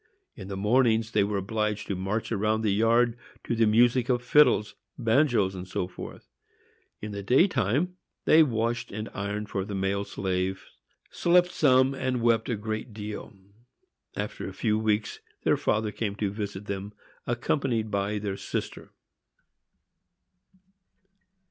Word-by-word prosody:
In 95 Hz, -4 st, -9 dB
the 100 Hz, -1 st, -5 dB
mornings 110 Hz, +1 st, +2 dB
they 105 Hz, -3 st, +3 dB
were 100 Hz, 0 st, -1 dB
obliged 105 Hz, +1 st, -2 dB
to 100 Hz, -, -3 dB
march 95 Hz, +6 st, -3 dB
round 110 Hz, +1 st, 0 dB
the 105 Hz, -3 st, +2 dB
yard 115 Hz, +3 st, +3 dB, 0.3 s
to 120 Hz, -, -2 dB
the 115 Hz, -1 st, +3 dB
music 120 Hz, +3 st, +3 dB
of 125 Hz, -1 st, +1 dB
fiddles, 125 Hz, -5 st, +4 dB, 0.2 s
banjoes, 115 Hz, -5 st, +2 dB
&c. 90 Hz, -1 st, -4 dB, 1.2 s
in 105 Hz, -, -4 dB
the 100 Hz, -1 st, -5 dB
day 130 Hz, -, +4 dB
time 140 Hz, -, 0 dB, 0.3 s
they 160 Hz, -, +7 dB
washed 115 Hz, -4 st, 0 dB
and 110 Hz, +2 st, -5 dB
ironed 105 Hz, +1 st, -4 dB
for 95 Hz, -, -2 dB
the 100 Hz, +1 st, -5 dB
male 95 Hz, +1 st, 0 dB
slaves, 95 Hz, -1 st, -2 dB, 0.5 s
slept 180 Hz, +1 st, +3 dB
some, 130 Hz, -4 st, +4 dB
and 130 Hz, -3 st, -2 dB
wept 115 Hz, -1 st, +2 dB
a 120 Hz, -, +1 dB
great 110 Hz, +2 st, -5 dB
deal. 105 Hz, 0 st, -6 dB, 0.8 s
After -, -, -4 dB
a -, -, -10 dB
few 110 Hz, -2 st, 0 dB
weeks 110 Hz, -1 st, 0 dB, 0.2 s
their -, -, +3 dB
father 110 Hz, 0 st, 0 dB
came 105 Hz, -2 st, -3 dB
to 100 Hz, -2 st, -1 dB
visit 100 Hz, -1 st, -5 dB
them, 100 Hz, +1 st, -5 dB, 0.3 s
accompanied 120 Hz, -2 st, -1 dB
by 100 Hz, +1 st, -1 dB
their 100 Hz, -1 st, -3 dB
sister. -, -, -5 dB
110 Hz, 140 wpm, -27 LUFS, 100-120 Hz, 1.2 s, they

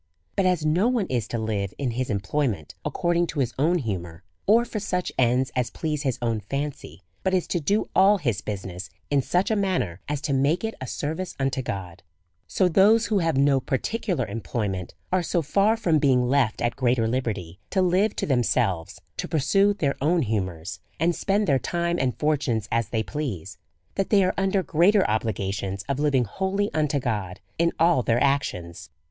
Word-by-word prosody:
But 195 Hz, -2 st, +2 dB
as 180 Hz, -4 st, +1 dB
no 175 Hz, +8 st, +3 dB
one 245 Hz, -5 st, +1 dB
is 120 Hz, -4 st, 0 dB
to 120 Hz, -, -3 dB
live 105 Hz, -3 st, -2 dB
in 135 Hz, -4 st, -1 dB
his 125 Hz, +2 st, -2 dB
employment 100 Hz, -, -1 dB
accord 175 Hz, 0 st, 0 dB
ing 175 Hz, 0 st, +2 dB
to 155 Hz, -, -4 dB
his 125 Hz, -3 st, 0 dB
own 165 Hz, +5 st, +3 dB
humour, 90 Hz, -, -4 dB, 0.2 s
or 230 Hz, +4 st, +5 dB
for 220 Hz, -, -4 dB
such 180 Hz, -3 st, -2 dB
ends 125 Hz, +1 st, +2 dB
as 125 Hz, -1 st, 0 dB
please 150 Hz, -3 st, -3 dB
his 135 Hz, -5 st, -1 dB
own 115 Hz, -2 st, 0 dB
ikncy, 140 Hz, -, -4 dB, 0.2 s
but 190 Hz, 0 st, +1 dB
is 180 Hz, -, +1 dB
to 175 Hz, -, 0 dB
do 200 Hz, +8 st, +1 dB
all 200 Hz, +2 st, +6 dB
his 120 Hz, -, -1 dB
business 95 Hz, -3 st, -6 dB, 0.2 s
in 140 Hz, -1 st, +4 dB
such 180 Hz, -, 0 dB
a -, -, +3 dB
man 195 Hz, -3 st, +1 dB
ner 85 Hz, -1 st, -6 dB
as 150 Hz, -1 st, -1 dB
to 145 Hz, -2 st, -1 dB
make 140 Hz, +8 st, +2 dB
it 225 Hz, 0 st, -2 dB
a 130 Hz, -, -4 dB
service 160 Hz, +9 st, -4 dB
unto 135 Hz, -1 st, 0 dB
God; 95 Hz, -6 st, -6 dB, 0.5 s
so 185 Hz, -, +2 dB
those 205 Hz, +6 st, +5 dB
who 210 Hz, -3 st, +1 dB
have 165 Hz, -5 st, +1 dB
no 140 Hz, 0 st, +4 dB
particular 170 Hz, -, -1 dB
employment 100 Hz, -3 st, -4 dB, 0.2 s
are 185 Hz, 0 st, +3 dB
so 170 Hz, 0 st, 0 dB
far 200 Hz, +9 st, +2 dB
from 170 Hz, -8 st, +2 dB
being 130 Hz, -3 st, +3 dB
left 125 Hz, -5 st, +1 dB
at 120 Hz, -, 0 dB
greater 120 Hz, -3 st, +2 dB
liberty 105 Hz, -8 st, -3 dB
to 190 Hz, -1 st, +2 dB
live 185 Hz, +4 st, +2 dB
to -, -, -1 dB
themselves, 95 Hz, -, 0 dB, 0.2 s
to -, -, -3 dB
pursue 195 Hz, +7 st, +3 dB
their 155 Hz, -9 st, 0 dB
own 165 Hz, +3 st, +2 dB
humours, 95 Hz, -6 st, -3 dB, 0.2 s
and 170 Hz, +2 st, +2 dB
spend 205 Hz, +2 st, +1 dB
their 140 Hz, -6 st, +3 dB
time 170 Hz, +2 st, -1 dB
and 130 Hz, -2 st, 0 dB
fortunes 135 Hz, -8 st, 0 dB
as 115 Hz, -3 st, 0 dB
they 110 Hz, -2 st, 0 dB
please, 130 Hz, -, -5 dB, 0.3 s
that 195 Hz, -, -1 dB
they 200 Hz, -2 st, +5 dB
are 185 Hz, -, +1 dB
under 195 Hz, 0 st, +1 dB
greater 190 Hz, +4 st, +3 dB
obligations 100 Hz, -3 st, -2 dB
of 140 Hz, 0 st, -1 dB
living 145 Hz, -4 st, +3 dB
wholly 190 Hz, -, -1 dB
unto 150 Hz, -2 st, +1 dB
God 105 Hz, -7 st, -3 dB, 0.2 s
in 170 Hz, 0 st, +3 dB
all 165 Hz, -4 st, +4 dB
their 115 Hz, 0 st, +1 dB
actions. 90 Hz, -11 st, -1 dB
140 Hz, 195 wpm, -25 LUFS, 110-180 Hz, 0.5 s, all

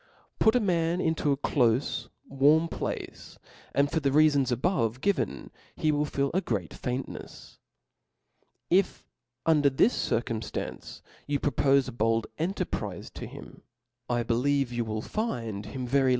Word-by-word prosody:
Put 220 Hz, -, +5 dB
a -, -, +5 dB
man 175 Hz, -4 st, +1 dB
into 160 Hz, -4 st, +1 dB
a 140 Hz, -, +1 dB
clofe 125 Hz, -2 st, +1 dB, 0.2 s
warm 145 Hz, +4 st, +4 dB
place, -, -, -5 dB, 0.3 s
and 140 Hz, 0 st, +2 dB
for 160 Hz, -, +1 dB
the 140 Hz, -2 st, +1 dB
reafons 145 Hz, -3 st, +4 dB
a* 120 Hz, -, +1 dB
bove 125 Hz, -, 0 dB
given, 200 Hz, +6 st, -1 dB, 0.2 s
he 155 Hz, -2 st, +1 dB
will 150 Hz, 0 st, +1 dB
feel 140 Hz, -1 st, -1 dB
a 190 Hz, -, +2 dB
great 100 Hz, -, -2 dB
faintnefs. 125 Hz, +2 st, -6 dB, 1.1 s
If 185 Hz, +1 st, +2 dB, 0.4 s
under 150 Hz, -3 st, +4 dB
this 140 Hz, -, +3 dB
circumftancc 115 Hz, -1 st, -3 dB, 0.2 s
you 145 Hz, -1 st, 0 dB
propofe 140 Hz, 0 st, +3 dB
a -, -, -4 dB
bold 115 Hz, -1 st, +1 dB
en 175 Hz, +5 st, 0 dB
terprize -, -, -4 dB
to -, -, -7 dB
him, -, -, -11 dB, 0.5 s
I 120 Hz, -1 st, +1 dB
believe 125 Hz, +3 st, +1 dB
you 120 Hz, -1 st, -1 dB
will 110 Hz, 0 st, -3 dB
find 115 Hz, -, -3 dB
him 125 Hz, +4 st, -5 dB
very 135 Hz, +1 st, +3 dB
140 Hz, 150 wpm, -28 LUFS, 120-160 Hz, 1.1 s, Put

